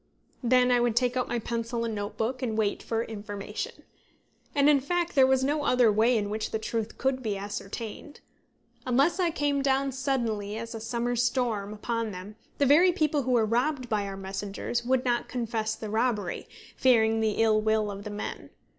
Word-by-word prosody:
Then 250 0 +4
I 245 - +4
would 240 -2 +1
take 250 0 +2
out 255 - 0
my 240 - -1
pencil 230 +1 -2
and 225 - -2
notebook, 220 +5 -3
and 225 -4 -2
wait 210 -2 0
for 225 0 -1
information. 210 - -6 0.7
And 285 0 +4
in 295 -2 +6
fact 345 +5 -1
there 265 -2 +6
was 265 0 +3
no 290 +2 0
other 250 -5 +4
way 225 +3 +3
in 205 -1 -2
which 215 0 -2
the - - -1
truth 220 0 -3
could 265 0 0
be 215 -4 -2
ascertained. 205 +7 -6 0.7
Unless 275 +9 +3
I 355 -2 +3
came 290 -3 0
down 275 0 +1
suddenly 230 -6 -2
as 230 +1 -6
a 225 - -5
summer's 235 +1 -1
storm 235 -5 0
upon 230 +1 -2
them, 195 +2 -8 0.2
the 285 - +3
very 325 +7 +6
people 305 -4 +1
who 255 -1 -2
were 230 -2 +4
robbed 250 +3 0
by 210 -2 0
our 195 0 -6
messengers 195 +4 -3
would 255 +1 +1
not 240 -1 0
confess 225 -3 -2
the 215 -2 -6
robbery, 220 -5 -1 0.3
fearing 225 -3 +4
the 220 -1 +1
ill 215 -1 +3
will 215 -1 +1
of 200 0 -7
the 210 - -6
men. 205 +1 -6
235 Hz, 190 wpm, -28 LUFS, 215-260 Hz, 0.7 s, in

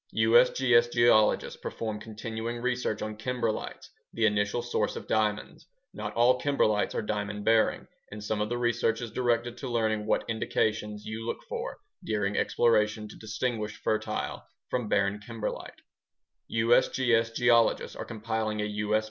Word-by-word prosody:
USGS 120 +1 +4
geologists 120 -3 +3
perform 110 -2 -4
continuing 110 +2 -5
research 125 -3 -1
on 110 0 -5
kimberlites, 115 -1 -3 0.2
the 115 - +1
initial 105 +2 +1
source 120 - -1
of - - -7
diamonds. 105 -1 -1 0.3
Not - - -5
all 125 +2 +4
kimberlites 110 -7 +1
are - - -1
diamond 105 -1 -3
bearing, 115 -1 +3 0.2
and 105 0 -8
some 105 0 -1
of 105 - -1
the 120 - -1
research 120 -1 +1
is 120 -3 -6
directed 120 -1 0
to 130 0 -5
learning 110 -3 0
what - - +1
indications 105 -1 -1
you 110 +1 -5
look 115 - -4
for - - -5 0.3
during 105 -2 -1
exploration 110 -2 +2
to - - -11
distinguish 110 0 -3
fertile 110 - -2 0.3
from 125 -4 -1
barren 100 +1 +1
kimberlite. 110 +1 -6 0.7
USGS 115 0 +2
geologists 120 -1 +3
are - - -5
compiling 110 -1 -3
a 105 - 0
U.S. 105 +1 0
110 Hz, 145 wpm, -28 LUFS, 105-120 Hz, 0.7 s, USGS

